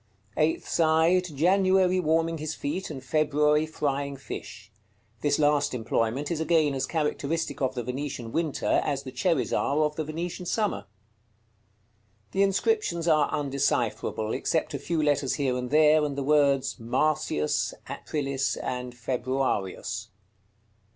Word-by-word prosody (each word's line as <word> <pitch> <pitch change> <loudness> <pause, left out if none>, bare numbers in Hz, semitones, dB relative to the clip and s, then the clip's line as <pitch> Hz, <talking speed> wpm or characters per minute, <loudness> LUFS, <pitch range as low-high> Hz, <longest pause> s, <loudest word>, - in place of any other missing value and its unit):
Eighth 155 +1 +1
side. 165 +2 +3
January 185 +3 +3
warming 165 0 +1
his 155 +1 -4
feet, 175 +7 -3
and 130 - -7
February 150 +1 +2
frying 140 -2 -2
fish. 105 -6 -8 0.5
This 145 -1 +2
last 145 -2 +2
employment 115 +4 -1
is 165 - -1
again 160 -3 +3
as 135 -1 -2
characteristic 155 0 -2
of 130 0 0
the 120 - -2
Venetian 125 -2 -4
winter 160 -1 +1
as 140 -2 -2
the 130 - -7
cherries 135 +3 0
are 145 +3 +1
of 150 0 -1
the 160 - -1
Venetian 170 +3 -5
summer. 200 - -1 1.4
The 195 - +1
inscriptions 195 - +1
are 155 -3 +4
undecipherable, 135 -5 -1
except 160 -1 -1
a 140 - -3
few 165 +1 -1
letters 145 -3 +1
here 135 -4 0
and 125 0 -3
there, 155 +1 +5
and 145 -2 -2
the 140 - -1
words 140 -2 +2
MARCIUS, 115 - 0
APRILIS, 140 -2 -2
and 125 -1 -4
FEBRUARIUS. 120 -5 -2
150 Hz, 135 wpm, -27 LUFS, 135-160 Hz, 1.4 s, there